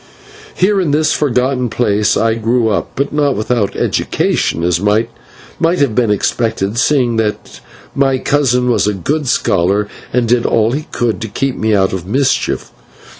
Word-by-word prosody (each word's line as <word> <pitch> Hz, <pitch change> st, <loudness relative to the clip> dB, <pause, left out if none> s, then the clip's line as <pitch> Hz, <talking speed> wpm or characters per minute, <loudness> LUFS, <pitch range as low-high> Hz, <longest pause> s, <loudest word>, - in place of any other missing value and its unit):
Here 195 Hz, +1 st, +2 dB
in 175 Hz, -, -1 dB
this 155 Hz, +2 st, +2 dB
forgotten 125 Hz, -2 st, 0 dB
place 105 Hz, -3 st, +1 dB
I 115 Hz, 0 st, +2 dB
grew 115 Hz, +1 st, 0 dB
up, 105 Hz, -, -1 dB
but 140 Hz, +2 st, -2 dB
not 145 Hz, -3 st, +1 dB
without 110 Hz, -1 st, -1 dB
education, 85 Hz, -, -1 dB
as 85 Hz, -1 st, +1 dB
might 105 Hz, +3 st, +1 dB, 0.5 s
have 165 Hz, -7 st, +2 dB
been 120 Hz, -1 st, +1 dB
expected, 110 Hz, +1 st, -1 dB
seeing 130 Hz, -4 st, +2 dB
that 110 Hz, -1 st, -3 dB, 0.3 s
my 135 Hz, -1 st, +1 dB
cousin 125 Hz, -3 st, +1 dB
was 115 Hz, -, +1 dB
a 105 Hz, -, 0 dB
good 145 Hz, -, -2 dB
scholar, 100 Hz, -4 st, +1 dB, 0.2 s
and 125 Hz, -1 st, +1 dB
did 120 Hz, 0 st, +2 dB
all 110 Hz, 0 st, +2 dB
he 150 Hz, +4 st, -4 dB
could 115 Hz, -2 st, -1 dB
to 110 Hz, -, -3 dB
keep 135 Hz, +5 st, -2 dB
me 110 Hz, -1 st, +1 dB
out 95 Hz, -1 st, +1 dB
of 90 Hz, -2 st, -5 dB
mischief. 130 Hz, +5 st, 0 dB
120 Hz, 165 wpm, -15 LUFS, 105-135 Hz, 0.5 s, Here